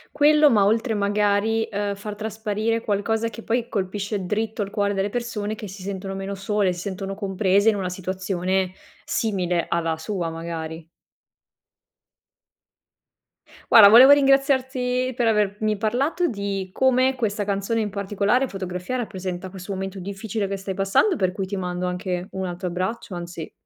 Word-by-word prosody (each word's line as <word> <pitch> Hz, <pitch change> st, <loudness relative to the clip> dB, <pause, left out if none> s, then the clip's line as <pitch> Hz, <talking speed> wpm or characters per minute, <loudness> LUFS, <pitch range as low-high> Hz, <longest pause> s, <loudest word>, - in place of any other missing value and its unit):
Quello, 300 Hz, 0 st, +6 dB
ma 205 Hz, -4 st, +4 dB
oltre 225 Hz, +2 st, +1 dB
magari, 205 Hz, +2 st, +1 dB
ehm, 205 Hz, 0 st, -2 dB
far 205 Hz, +1 st, -7 dB
trasparire 220 Hz, +1 st, -2 dB
qualcosa 220 Hz, +2 st, 0 dB
che 230 Hz, 0 st, -10 dB
poi 235 Hz, +1 st, -1 dB
colpisce 200 Hz, 0 st, -2 dB
dritto 215 Hz, +2 st, -1 dB
al 200 Hz, -, -7 dB
cuore 205 Hz, -1 st, 0 dB
delle 195 Hz, +1 st, 0 dB
persone 230 Hz, -4 st, -3 dB
che 215 Hz, -1 st, -7 dB
si 190 Hz, 0 st, -10 dB
sentono 195 Hz, 0 st, -5 dB
meno 195 Hz, +1 st, -4 dB
sole, 200 Hz, -1 st, 0 dB
si 175 Hz, -, -8 dB
sentono 195 Hz, 0 st, -4 dB
comprese 195 Hz, +1 st, +2 dB
in 215 Hz, -, +2 dB
una 190 Hz, -2 st, -2 dB
situazione 185 Hz, 0 st, -2 dB, 0.3 s
simile 180 Hz, -6 st, -1 dB
alla 165 Hz, -1 st, 0 dB
sua, 175 Hz, 0 st, -3 dB
magari. 165 Hz, -1 st, -6 dB, 2.8 s
Guarda, 210 Hz, -3 st, +10 dB
volevo 255 Hz, +6 st, +9 dB
ringraziarti 260 Hz, -2 st, +2 dB
per 240 Hz, -2 st, +1 dB
avermi 210 Hz, 0 st, +1 dB
parlato 255 Hz, -, 0 dB
di 200 Hz, -, -3 dB
come 260 Hz, 0 st, +3 dB
questa 210 Hz, -4 st, -1 dB
canzone 200 Hz, +3 st, -1 dB
in 210 Hz, -, -2 dB
particolare, 205 Hz, +6 st, +1 dB
"Fotografia", 185 Hz, +3 st, -5 dB
rappresenta 190 Hz, -5 st, -4 dB
questo 190 Hz, +1 st, -8 dB
momento 190 Hz, 0 st, -5 dB
difficile 200 Hz, +2 st, -4 dB
che 195 Hz, 0 st, -3 dB
stai 195 Hz, 0 st, -5 dB
passando 195 Hz, -, +2 dB
per 185 Hz, -2 st, +1 dB
cui 190 Hz, 0 st, -3 dB
ti 200 Hz, +2 st, -5 dB
mando 180 Hz, -1 st, -3 dB
anche 180 Hz, 0 st, -3 dB
un 190 Hz, -1 st, -3 dB
altro 180 Hz, +1 st, -4 dB
abbraccio 185 Hz, +4 st, -3 dB
anzi, 170 Hz, -2 st, -7 dB
200 Hz, 150 wpm, -23 LUFS, 190-225 Hz, 2.8 s, Guarda